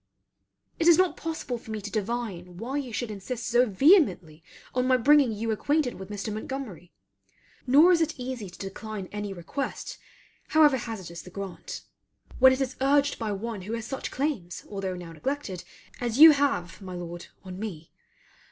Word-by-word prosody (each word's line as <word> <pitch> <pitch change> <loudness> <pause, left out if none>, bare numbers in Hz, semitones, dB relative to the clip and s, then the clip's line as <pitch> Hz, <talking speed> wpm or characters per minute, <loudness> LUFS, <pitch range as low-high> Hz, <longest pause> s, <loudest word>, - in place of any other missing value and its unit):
It 330 - +2
is 340 - +8
not 370 -1 +3
possible 315 -7 -4
for 225 - -15
me 220 -1 -3
to 205 0 -7
divine 200 -5 -3
why 250 +8 -3
you 270 -4 -4
should 225 +1 -3
insist 225 +4 -5
so 245 +1 +4
vehemently 205 - +3 0.3
on 250 0 +1
my 255 0 +5
bringing 280 0 +5
you 220 +1 -2
acquainted 285 +4 +1
with 190 0 -8
Mr. 205 +1 -4
Montgomery; 215 -6 -6 0.8
nor 300 +8 +7
is 340 -2 +4
it 320 - -1
easy 250 -5 -5
to 180 - -14
decline 195 0 -6
any 205 -1 -4
request 195 +10 -5 0.5
however 300 -3 +5
hazardous 190 -9 -6
the - - -12
grant, 200 - -7 0.6
when 260 +1 +8
it 260 +1 0
is 260 -1 -2
urged 285 +1 +3
by 220 -3 -2
one 210 +1 -4
who 210 +5 -6
has 230 -1 -3
such 270 +3 -4
claims, 255 - -3
although 195 -2 -4
now 175 -2 -8
neglected, 215 - -4 0.4
as 240 -1 -2
you 320 +2 +11
have, 275 - 0
my 185 -2 -7
Lord, 175 0 -7 0.2
on 185 -1 -8
me. 175 -7 -6
225 Hz, 175 wpm, -27 LUFS, 190-270 Hz, 0.8 s, you